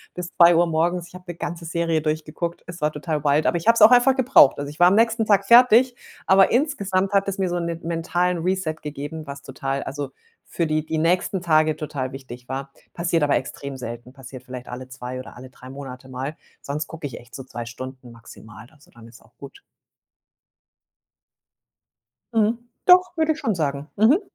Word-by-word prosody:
bis 180 -1 -6
2:00 170 0 +6
morgens 170 +2 -1
ich - - -20
habe 180 0 -12
'ne - - -11
ganze 170 -1 -5
Serie 165 -1 0
durchgeguckt. 155 +2 -3
Es 175 -1 -10
war 150 - +1
total 150 0 -4
wild, 145 +2 +2
aber 175 - +2
ich 170 - -7
habe 230 - +6
es 230 - 0
auch 215 - +9
einfach 250 +2 +5
gebraucht. 260 - +5
Also, 145 0 -5
ich 150 - -15
war 175 - +7
am 190 - +4
nächsten 230 0 +2
Tag 200 -1 +3
fertig, 245 +2 +6 0.3
aber 190 0 +5
insgesamt 200 -9 0
hat 200 0 +2
es 195 0 -3
mir 190 - 0
so 175 0 -1
'nen 170 -1 -3
mentalen 170 +2 -1
Reset 185 -2 -1
gegeben, 150 +1 -7
was 140 0 -8
total 135 +1 -4
also, 140 0 -5 0.4
für 170 - -2
die 155 0 0
die 160 - -3
nächsten 180 +3 +1
Tage 155 -2 +2
total 145 -4 -5
wichtig 125 -2 -11
war. 135 +1 -5 0.2
Passiert 170 -1 0
aber 145 - +2
extrem 140 +1 -6
selten, 120 0 -8
passiert 130 -1 -11
vielleicht 125 -1 -9
alle 130 +1 -8
2 125 0 -7
oder 130 - -11
alle 130 +1 -11
3 130 - -14
Monate 130 -1 -9
mal. 130 +4 -5 0.3
Sonst 150 +2 -4
gucke 160 -1 -9
ich 130 - -9
echt 120 0 -15
so 135 - -7
2 120 -2 -7
Stunden 130 +1 -9
maximal. 110 -1 -14
Also, 150 0 -23
dann 115 -1 -16
ist 115 0 -17
auch 115 - -26
gut. 140 -1 -12 2.7
Mhm, 225 +1 +2 0.3
doch, 365 -1 +5
würde 315 0 +2
ich 310 - -11
schon 225 -9 -1
sagen, 145 -2 -3
mhm. 240 - +4
155 Hz, 200 wpm, -23 LUFS, 135-185 Hz, 2.7 s, auch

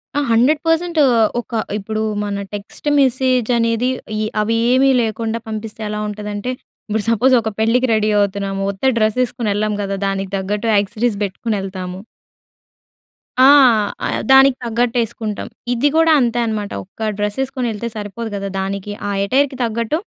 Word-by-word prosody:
ఆ! 290 - +2
100% 315 +7 +2 0.4
ఒక - - -26 0.3
ఇప్పుడు 215 +1 -3 0.2
మన 200 -1 -3
టెక్స్ట్ 205 +8 -8
మెసేజ్ 255 -2 +2
అనేది 230 +2 +1 0.3
ఏ 215 - 0 0.2
అవి 225 +2 0 0.2
ఏవీ 270 +1 +4
లేకుండా 225 0 -2
పంపిస్తే 220 0 -6
ఎలా 210 0 -3
ఉంటదంటే, 210 +3 -4 0.4
ఇప్పుడు 215 0 -1
సపోజ్ 250 +4 +3
ఒక 220 - -2
పెళ్ళికి 245 +3 +2
రెడీ 215 0 +2
అవుతున్నాము. 200 -1 -1
ఉత్త 260 +6 +1
డ్రెస్ 215 +1 +1
ఏసుకొని 235 -3 -3
ఎళ్ళము 210 0 -1
కదా! 195 0 -3
దానికి 195 0 -3
తగ్గట్టు 205 +4 -2
ఆక్సెసరీస్ 210 +2 -1
బెట్టుకొని 205 +2 -3
ఎళ్తాము. 185 -1 -6 1.5
ఆ! - - +9 0.6
ఆహ్, - - -1
దానికి 270 -1 +7
తగ్గట్టు 235 +1 0
ఏసుకుంటాం. 220 -2 -5 0.3
ఇది 265 +5 +2
గూడా 325 0 +5
అంతే 240 -1 +1
అనమాట. 210 -2 -3
ఒక్క 215 +3 -5
డ్రెస్ 210 +1 -2
ఏసుకొని 260 -2 -3
ఎళ్తే 220 +2 -4
సరిపోదు 215 +2 -5
గదా! 200 0 -3
దానికి 195 +1 -4 0.2
ఆ - - -1
ఎటైర్‌కి 265 +4 +1
తగ్గట్టు, 230 +5 -1
220 Hz, 150 wpm, -18 LUFS, 205-245 Hz, 1.5 s, ఆ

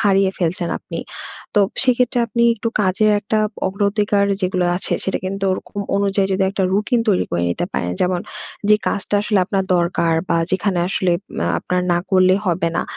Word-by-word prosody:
হারিয়ে 195 -2 +3
ফেলছেন 175 0 -1
আপনি। - - -7 0.6
তো 205 - +5 0.2
সেক্ষেত্রে 250 -1 +2
আপনি 235 0 -1
একটু 230 +1 -3
কাজের 205 +2 +2
একটা 215 +2 -1 0.3
অগ্র 195 +2 -5
অধিকার 205 -1 +1 0.2
যেগুলো 180 -1 0
আছে, 185 - -1
সেটা 190 - -1
কিন্তু 195 +1 -3
ওরকম 200 - -6 0.2
অনুযায়ী 200 -1 +1
যদি 190 0 +1
একটা 195 0 -2
রুটিন 210 +5 +1
তৈরি 190 - +3
করে 85 0 -1
নিতে 85 - -1
পারেন। 90 - -2
যেমন, 180 -1 +1 0.5
যে 210 - +7
কাজটা 200 +1 -2
আসলে 210 -1 +1
আপনার 195 -2 0
দরকার 170 -1 +1
বা, 170 - +2
যেখানে 185 -1 0
আসলে 185 -2 +1 0.3
আ - - -1
আপনার 180 - -1
না 175 - +2
করলে 185 0 +5
হবে 170 -1 +1
না। - - +1
195 Hz, 180 wpm, -19 LUFS, 180-205 Hz, 0.6 s, যে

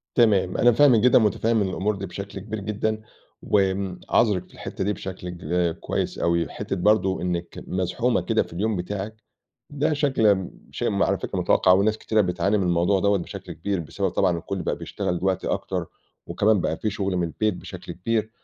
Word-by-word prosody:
تمام، 100 -6 +3
أنا 120 +1 +5
فاهمِك 125 -2 +5
جدًا 125 +2 +6
ومتفهّم 110 0 +2
الأمور 100 +2 -1
دي 100 0 -5
بشكل 100 +2 -7
كبير 110 +2 -5
جدًا، 110 +2 -2 0.4
وآمم 95 -2 0
عاذرِك 105 -6 +2
في - - -21
الحتّة 95 - -5
دي 105 - +1
بشكل 90 -1 -6
ك 85 0 -1
كويس - - -2
أوي، 85 -1 +1
حتّة 95 - -4
برضه 95 -1 +2
إنِّك 85 -1 -3
مزحومة 95 +7 0
كده - - +1
في - - -12
اليوم 105 +4 -1
بتاعِك، 100 +4 -4 0.6
ده 150 +2 0
شكل 140 -6 +2
امم 95 -3 +3 0.2
شيء - - -1
م - - +1
على - - +2
فكرة - - -4
متوقّع، 90 - +4
وناس 105 +3 +3
كتيرة 110 -1 +1
بتعاني 100 +2 +1
من 95 - 0
الموضوع 90 +2 +2
دوَّة 100 +1 +3
بشكل 90 - -7
كبير، 95 +2 -2
بسبب 95 +5 -2
طبعًا 95 - +2
إن - - -1
الكُلّ 90 +3 -4
بقى - - -1
بيشتغل 90 - -3
دلوقتي 95 +1 -1
أكتر، - - -2 0.4
وكمان 105 -1 +2
بقى 80 - -1
في 110 - -2
شغل 95 -2 -2
من 85 -1 +1
البيت 105 +5 -1
بشكل - - -8
كبير، 110 +4 -1
100 Hz, 190 wpm, -24 LUFS, 90-110 Hz, 0.6 s, جدًا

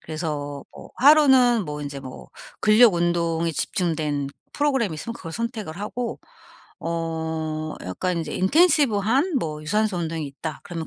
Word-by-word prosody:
그래서 150 -3 -5
뭐 - - -12
하루는 260 -6 +6
뭐 150 -2 -5
인제 140 -1 -6
뭐 130 -1 -10 0.3
근력 215 -1 +6
운동에 170 -1 0
집중된 155 -4 -1 0.2
프로그램이 265 - 0
있으면 230 +9 -6
그걸 165 -7 -8
선택을 220 -5 -4
하고 235 +3 -4 0.6
어 160 -2 -3
약간 170 - -2
인제 160 -2 -4
'intensive 290 - +3
한 270 - +1
뭐 155 -6 -4
유산소 210 +4 0
운동이 165 -2 -3
있다.' 145 +2 -7
그러면 165 -2 -5
170 Hz, 335 characters per minute, -23 LUFS, 155-230 Hz, 0.6 s, 하루는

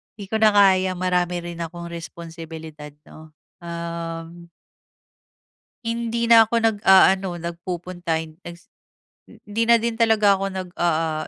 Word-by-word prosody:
‘di 200 -1 -11
ko 220 - 0
na 215 -1 +4
kaya 190 -2 +4
marami 180 -1 -1
rin 170 0 -7
akong 170 +1 -7
responsibilidad, 160 -3 -9
‘no? 155 -1 -16 0.2
Um. 170 0 -7 1.4
Hindi 235 0 -2
na 225 -1 +8
ako 230 - -5
nag-aano 190 -4 +3
nagpupunta 175 0 -5
en 155 0 -13
egs 175 0 -11 0.6
eh, - - -16
hindi 225 +2 -2
na 235 - +7
din 230 0 -3
talaga 215 -3 +4
ako 195 - -2
nag, 185 -2 -6
ah 160 -2 0
175 Hz, 135 wpm, -22 LUFS, 170-205 Hz, 1.4 s, na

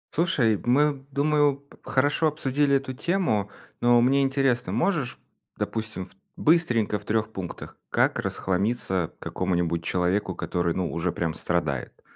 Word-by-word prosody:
Слушай, 130 - +2
мы, 140 +2 +2
думаю, 145 0 +3
п 140 0 -21
хорошо 145 +4 +2
обсудили 145 -1 +1
эту 135 -1 -1
тему, 130 - 0 0.3
но 120 0 +5
мне 135 +3 +4
интересно: 135 -7 +1
можешь, 135 - 0 0.4
допустим, 110 -4 -3
в - - -20 0.3
быстренько, 125 -11 +2
в - - -18
3 110 0 -1
пунктах, 90 -3 -7
как - - +2
расхламиться 95 -2 -1
какому-нибудь 85 -2 -1
человеку, 90 +2 0
который, 85 0 -1
ну, 90 -2 -2
уже 85 +1 -1
прям 85 -2 -2
страдает? 80 -6 -2
115 Hz, 135 wpm, -26 LUFS, 90-140 Hz, 0.4 s, но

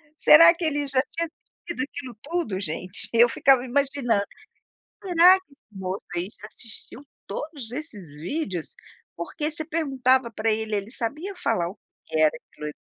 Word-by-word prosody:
Será 330 +2 +8
que 340 - -7
ele 290 -2 0
já 265 -1 +3
tinha 335 0 -1
assistido 325 -2 -9
aquilo 260 -4 -8
tudo, 300 - -2
gente? 180 +2 -1
Eu 235 +1 +6
ficava 260 +1 +3
imaginando, 265 -5 +1 0.8
será 360 +1 +7
que 375 - -31
esse 220 -8 -17
moço 190 +1 -4
aí 175 +2 -2
já 210 - -8
assistiu 230 +3 -7 0.2
todos 265 +1 -6
esses 235 - -7
vídeos? 180 - -4 0.4
Porque 295 - -4
você 315 0 -6
perguntava 265 -6 +1
pra 225 0 -1
ele, 220 0 -1
ele 200 +2 -4
sabia 300 - -3
falar 175 - 0
o 195 +2 -11 0.3
que 160 - -2
era 155 -1 +6
aquilo 150 - -12
ali. 150 - -4
255 Hz, 165 wpm, -25 LUFS, 205-305 Hz, 0.8 s, Será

